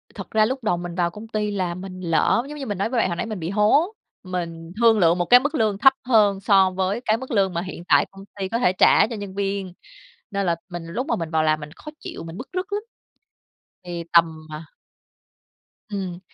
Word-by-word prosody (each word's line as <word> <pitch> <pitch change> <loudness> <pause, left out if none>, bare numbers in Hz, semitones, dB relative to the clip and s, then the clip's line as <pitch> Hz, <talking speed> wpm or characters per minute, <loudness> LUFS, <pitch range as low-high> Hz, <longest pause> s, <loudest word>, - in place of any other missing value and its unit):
thật - - -8
ra 215 -1 +4
lúc 260 +1 -3
đầu 180 -5 +1
mình 175 0 -6
vào 175 -2 +1
công 215 +3 -10
ty 210 -1 -2
là 185 -4 -2
mình 185 0 -8
lỡ 170 +7 +2
giống 300 - -7
như 275 - -5
mình 205 -4 -3
nói 200 - -1
với 245 - -2
bạn - - +3
hồi 170 - -2
nãy - - -3
mình 215 -3 -5
bị 165 0 -4
hố. 220 - +3 0.3
Mình 170 -3 -5
thương 225 -2 +5
lượng 170 -1 +4
một 175 - 0
cái 245 - +8
mức 290 +4 -2
lương 215 -6 +1
thấp 270 +5 +6
hơn 210 -5 +4
so 195 -1 +4
với 190 +4 -1
cái 220 +1 +2
mức 260 +2 -8
lương 195 -5 +2
mà 170 - -1
hiện 185 -2 -7
tại - - +5
công 195 0 -12 0.2
ty 190 - -1
có 230 +4 -1
thể 245 -7 +3
trả 185 - +5
cho 230 - -5
nhân 200 -2 -7
viên. 195 -2 -2 0.6
Nên 200 -1 -1
là 170 -2 +2
mình 175 -2 -6
lúc 240 - -3
mà - - +1
mình 165 -2 -4
vào 160 -1 +2
làm 155 0 +2
mình 150 0 -9
khó 300 - -11
chịu, - - -8
mình 165 +1 -8
bứt 250 - -7
rứt 375 +3 -3
lắm. 410 - -1 1.0
Thì 175 -1 -5
tầm, 165 -2 +4
à 155 +2 -7 1.2
Ừm. 190 -4 -5
195 Hz, 240 wpm, -23 LUFS, 175-225 Hz, 1.2 s, cái